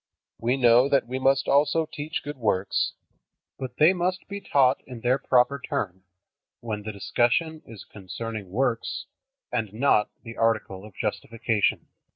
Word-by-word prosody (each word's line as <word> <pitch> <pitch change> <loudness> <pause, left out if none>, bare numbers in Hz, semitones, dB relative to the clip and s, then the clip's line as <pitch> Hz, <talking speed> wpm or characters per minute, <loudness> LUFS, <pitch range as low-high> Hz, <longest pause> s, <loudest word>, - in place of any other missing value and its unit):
We 120 +3 +1
know 125 +1 +5
that 140 - +3
we 130 +2 -4
must 135 +1 +2
also 150 +3 +3
teach 155 0 -5
good 145 -1 -6
works, 100 -5 0 0.7
but 130 -2 -6
they 155 +5 +6
must 185 +1 -2
be 200 0 -6
taught 135 -8 +3
in 125 -3 -9
their 125 +3 +2
proper 130 +3 +3
turn, 95 -7 -3 0.6
when 110 -3 -4
the 110 +1 -5
discussion 120 +10 0
is 110 -5 -10
concerning 105 +1 -7
works 115 -5 -1 0.5
and 110 -5 -2
not 110 -2 +2
the 115 -1 -9
article 110 -4 0
of 105 - -14
justification. 110 0 -1
120 Hz, 150 wpm, -26 LUFS, 110-140 Hz, 0.7 s, they